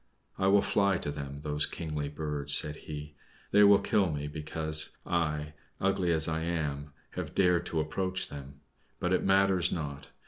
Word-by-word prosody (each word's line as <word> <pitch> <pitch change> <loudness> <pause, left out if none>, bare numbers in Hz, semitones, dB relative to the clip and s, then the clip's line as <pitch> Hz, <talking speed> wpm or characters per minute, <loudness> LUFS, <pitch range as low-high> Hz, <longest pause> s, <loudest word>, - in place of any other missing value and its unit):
"I 95 - 0
will 100 +1 +5
fly 100 -2 +2
to 75 - -4
them, 70 -1 -7
those 75 -1 0
kingly 75 -3 -4
birds!" 75 -1 0
said 75 0 +4
he. 75 -1 -8 0.4
"They 105 +1 +6
will 100 0 +8
kill 100 -2 +1
me, 75 -1 -4
because 80 +1 -1
I, 75 -3 -1 0.3
ugly 95 -2 +1
as 80 -1 +2
I 80 0 -1
am, 75 -4 -3 0.2
have - - -6
dared 90 -2 +3
to 80 - -2
approach 95 +4 -1
them. 70 0 -10 0.4
But - - 0
it - - +1
matters 95 -2 +3
not. 75 -3 -5
80 Hz, 170 wpm, -30 LUFS, 75-90 Hz, 0.4 s, will